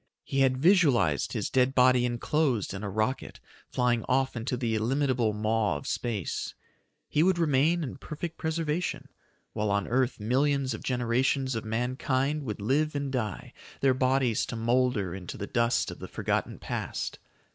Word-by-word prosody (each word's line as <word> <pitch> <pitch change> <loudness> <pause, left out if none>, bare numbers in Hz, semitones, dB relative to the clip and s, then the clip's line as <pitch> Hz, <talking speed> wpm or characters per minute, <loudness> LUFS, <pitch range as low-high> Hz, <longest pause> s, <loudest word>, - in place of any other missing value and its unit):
He 135 - -2
had 130 -1 +3
visualized 135 - +3
his - - -2
dead 130 0 +2
body 125 -1 +5
enclosed 120 - 0
in 95 - -5
a 100 - -3
rocket 110 +6 -2 0.3
flying 120 -2 +1
off 130 0 +2
into 125 +2 -2
the 115 -2 -1
illimitable 125 0 +1
maw 105 -4 0
of 70 - -10
space. 110 -8 -3 0.5
He 150 - +1
would 185 +1 +3
remain 160 +1 +2
in 135 - -5
perfect 155 +4 -6
preservation, 160 +1 -2 0.4
while 105 0 -1
on 100 -1 0
earth 125 0 +1
millions 135 +4 +1
of 110 - -6
generations 130 +2 0
of 115 -1 -3
mankind 130 +5 0
would 105 -3 -4
live 145 +8 +1
and 140 -1 -2
die, 110 -7 -3 0.3
their 135 -1 +4
bodies 130 -2 +2
to - - -5
molder 115 -5 +1
into 95 -2 -7
the 100 - -4
dust 115 +2 +1
of - - -10
the - - -7
forgotten - - -2
past. - - -4
125 Hz, 160 wpm, -28 LUFS, 110-140 Hz, 0.5 s, body